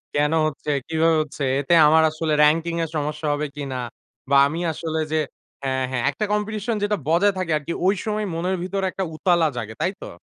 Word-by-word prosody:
কেন 150 +1 +2 0.2
হচ্ছে, 150 0 -6 0.2
কিভাবে 160 0 +2
হচ্ছে? 145 -1 -7 0.2
এতে 145 +5 +1
আমার 160 +1 +5
আসলে 155 -1 -2
র‍্যাংকিনং 165 +2 +2
এর 160 - -4
সমস্যা 150 +1 -2
হবে 150 +1 -2
কিনা? 135 -3 -4 0.5
বা 140 - +3
আমি 160 +4 -4
আসলে 160 0 -3
যে - - +2 0.5
হ্যাঁ, 130 -1 0
হ্যাঁ, 125 -2 -1
একটা 215 - -2
কম্পিটিশন 215 +2 -1
যেটা 205 0 +1
বজায় 185 +5 +3
থাকে 180 -3 -2
আরকি 150 +3 -5
ঐ - - +5 0.2
সময় 215 0 -1
মনের 180 +3 -1
ভিতরে 195 +1 -2
একটা 190 - -3
উতালা 170 -1 +3
জাগে। 110 -1 -5
তাই 185 - +1
তো? - - -7
160 Hz, 195 wpm, -23 LUFS, 150-185 Hz, 0.5 s, আমার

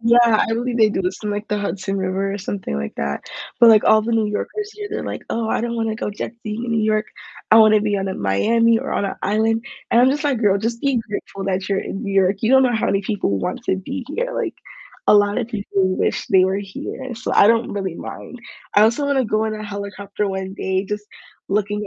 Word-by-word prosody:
yeah, 235 -1 +5
I - - 0
believe 240 +1 -1
they 215 -1 +6
do 200 - -2
this 180 - -2
in, 210 - -2
like, 205 +1 -3
the 210 - 0
Hudson 195 -1 -3
River 190 +1 -1
or 200 - -4
something 195 - -4
like 70 0 -4
that. 70 0 -3 0.4
But, 235 - +9
like, 215 -1 +6
all 215 0 +5
the 230 - -3
New 225 -1 +2
Yorkers 410 - -4
here, 415 -1 -7
they're 430 - -3
like, - - -5
"Oh, 225 -1 -1
I - - 0
don't 235 0 -2
wanna 225 -1 -1
go 210 - -3
jet 205 - -5
skiing 215 +1 -5
in 235 - -2
New 225 -1 +1
York, 215 0 +1 0.5
I - - +9
wanna 215 -1 +6
be 210 -1 0
out 195 - -2
in 190 - -5
Miami 225 - +3
or - - -5
on - - 0
an 195 - -2
island." 220 +3 +1 0.3
And 235 - +5
I'm 255 +2 +5
just 295 +2 -2
like, 275 -5 +1
"Girl, 200 -3 +3
just 230 +3 -3
be 275 -4 +1
grateful 200 -1 -5
that 190 0 -2
you're 195 -1 +1
in 200 - -5
New 200 - -3
York, 195 0 +3
you 225 - +2
don't 265 0 +6
know 245 -2 +2
how 220 - 0
many 195 0 +1
people 190 - -1
want 90 - -3
to - - +1
be 265 +8 -5
here." - - -2
Like, - - -2 0.5
a - - +6
lotta 205 +3 +3
people 200 -4 -1
wish - - -1
they 190 -1 +5
were 190 +1 0
here, 220 +6 -6
so 230 - -4
I - - +7
don't 230 0 +2
really 190 -4 -3
mind. 250 - -8 0.3
I 205 - +6
also 235 +6 +2
wanna 275 -2 +2
go 215 0 0
on 215 - -2
a 215 - -6
helicopter 200 0 -4
one 190 0 -4
day 190 -1 -1
just 210 +1 -5 0.4
looking 205 +1 -1
210 Hz, 250 wpm, -20 LUFS, 195-230 Hz, 0.5 s, But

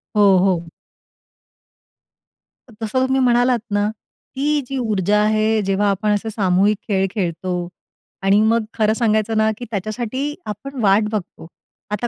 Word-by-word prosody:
हो, 200 -2 +5
हो. 175 -3 0 2.0
तर - - -15
तसं 260 +4 0
तुम्ही 265 0 +1
म्हणालात 245 0 +3
ना, 205 0 +1 0.5
ती 290 +2 +1
जी 270 - -4
ऊर्जा 210 -4 +1
आहे, 215 +1 +2
जेव्हा 195 +1 +1
आपण 200 +2 0
असे 210 +2 -2
सामूहिक 200 0 +2
खेळ 195 -3 +1
खेळतो 180 -2 -2 0.5
आणि 195 +2 +4
मग 225 +1 +2
खरं 215 -1 +2
सांगायचं 220 -1 +1
ना 220 0 +3
की 245 - -7
त्याच्यासाठी 240 +8 -3
आपण 245 +7 -7
वाट 200 0 +4
बघतो. 195 -6 -5 0.4
आता 210 +3 -1
215 Hz, 140 wpm, -20 LUFS, 195-235 Hz, 2.0 s, हो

